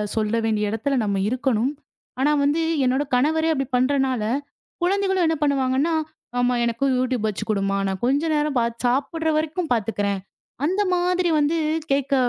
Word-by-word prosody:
சொல்ல 215 0 0
வேண்டிய 210 -2 0
இடத்துல 225 +6 -1
நம்ம 200 -1 0
இருக்கணும். 255 0 0 0.5
ஆனா 290 +3 +3
வந்து 295 +4 +2 0.2
என்னோட 260 +3 +2
கணவரே 315 +5 +2
அப்டி 270 -2 -1
பண்றனால 260 -2 +1 0.6
குழந்தைகளும் 385 -1 +2
என்ன 325 - +1
பண்ணுவாங்கன்னா, 280 +2 +1 0.5
"அம்மா, 245 0 +2
எனக்கும் 235 +4 0
YouTube 255 -3 0
வச்சு 200 -5 -3
கொடும்மா. 195 -1 0
நான் 190 -1 -3
கொஞ்ச 275 +4 +2
நேரம் 295 -2 0
பாத்துச் 235 +1 -2
சாப்புடுற 290 +6 0
வரைக்கும் 315 +2 -2
பாத்துக்குறேன்." 205 -3 -1 0.5
அந்த 380 +5 +1
மாதிரி 360 0 +1
வந்து 295 +3 +1 0.4
கேட்க 275 0 0
265 Hz, 145 wpm, -23 LUFS, 230-310 Hz, 0.6 s, ஆனா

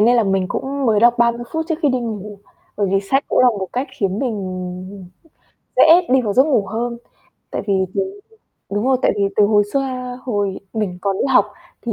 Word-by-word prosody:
nên 240 +3 +5
là 230 - +4
mình 195 -1 +1
cũng 275 0 -3
mới 215 -2 +3
đọc 240 +1 +4
30 235 0 +2
phút 320 0 -2
trước 325 - +1
khi 295 - +4
đi 255 -1 0
ngủ, 210 -3 -6 0.4
bởi 205 -1 +1
vì 195 0 +2
sách 270 +8 0
cũng - - +1
là 255 - +6
một 200 -5 -3
cách 255 +3 -2
khiến 195 0 0
mình 185 -4 -5 0.7
dễ 340 +2 +7
đi 260 0 +4
vào 210 -4 -2
giấc 260 - +6
ngủ 260 -10 +1
hơn. 235 +4 -3 0.5
Tại - - -3
vì, 200 - +1 0.2
đúng 390 +1 -2 0.5
đúng 205 +5 -1
rồi 265 - +4
tại - - +3
vì 200 - +1
từ 210 - +5
hồi 205 -1 +3
xưa 255 -2 -3
hồi 205 -6 -2
mình 205 -5 -3
còn 195 -1 -1
đi - - +1
học 205 - +6 0.4
thì 235 - -3
225 Hz, 215 wpm, -19 LUFS, 200-255 Hz, 0.7 s, dễ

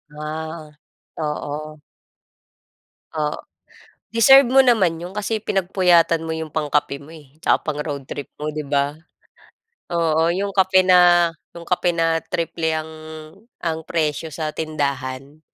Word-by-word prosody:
Ah, 155 +1 -6 0.5
oo. 150 0 -4 1.3
Oh, 150 -1 -1 0.7
deserve 270 +4 +6
mo 265 +2 +6
naman 185 -9 +2
'yon 180 - -7
kasi 210 +2 -3
pinagpuyatan 175 -4 +2
mo 160 - -4
'yong 160 0 -4
pangkape 150 -2 0
mo, 155 - -14
eh, 150 -3 -15
'tsaka - - +4
pang 150 -1 -4
road 140 -3 -5
trip 145 - -7
mo, 150 - -3
'di 150 0 -4
ba. 140 +1 0 0.9
Oo, 165 -2 +1
'yong 200 +1 -2
kape 190 -1 +4
na 175 -2 +5 0.2
'yong 170 - -8
kape 175 0 0
na 165 -1 +2
triple 160 0 -2
ang 155 0 -4 0.7
ang 160 -1 -3
presyo 155 -1 -1
sa 155 -2 -3
tindahan, 140 -2 -4
160 Hz, 130 wpm, -21 LUFS, 150-175 Hz, 1.3 s, deserve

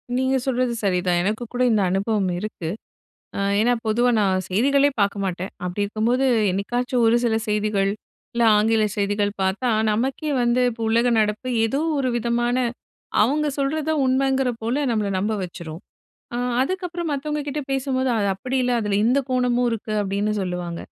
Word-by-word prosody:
நீங்க 260 +1 +1
சொல்றது 250 -1 +1
சரிதான். 180 -2 +1
எனக்கு 215 +4 -1
கூட 250 - -2
இந்த 210 -2 +3
அனுபவம் 195 0 0
இருக்கு. 180 -6 -5 0.7
அ - - -2 0.2
ஏன்னா, 245 +3 +3
பொதுவா 240 +3 +2
நான் 190 -2 +1
செய்திகளே 275 +8 +3
பாக்க 200 0 +1
மாட்டேன். 185 0 -3
அப்டி 180 +3 -3
இருக்கும்போது, 235 +6 0 0.3
என்னைக்காச்சும் 245 +5 -1
ஒரு 225 +1 +4
சில 225 -2 +2
செய்திகள் 210 -2 +1 0.4
இல்ல 235 0 +1
ஆங்கில 220 +1 +3
செய்திகள் 205 0 0
பாத்தா, 195 +7 0 0.2
நமக்கே 265 +7 -1
வந்து 240 +1 +2
இப்போ 230 -1 -8
உலக 235 +2 +3
நடப்பு 210 +4 -1 0.2
ஏதோ 270 +6 -1 0.2
ஒரு 255 -2 0
விதமான 240 +1 0 0.7
அவங்க 295 +7 +2
சொல்றத 305 +3 -1
உண்மைங்கிற 265 0 +2
போல 240 +6 -1
நம்மள 210 -3 0
நம்ப 210 +3 0
வச்சுரும். 170 -1 -8 0.5
அ - - -2 0.2
அதுக்கப்புறம் 350 +1 -2
மத்தவங்க 300 +1 -2
கிட்ட 290 +1 -2
பேசும்போது 260 -1 0
அது 200 -1 +1
அப்டி 255 +7 -3
இல்ல 250 - +1
அதுல 205 -1 0
இந்த 255 +4 +3
கோணமும் 250 -1 +1
இருக்கு, 215 -1 -4
அப்டின்னு 200 +2 -1
சொல்லுவாங்க. 180 -2 -4
230 Hz, 155 wpm, -22 LUFS, 200-260 Hz, 0.7 s, ஒரு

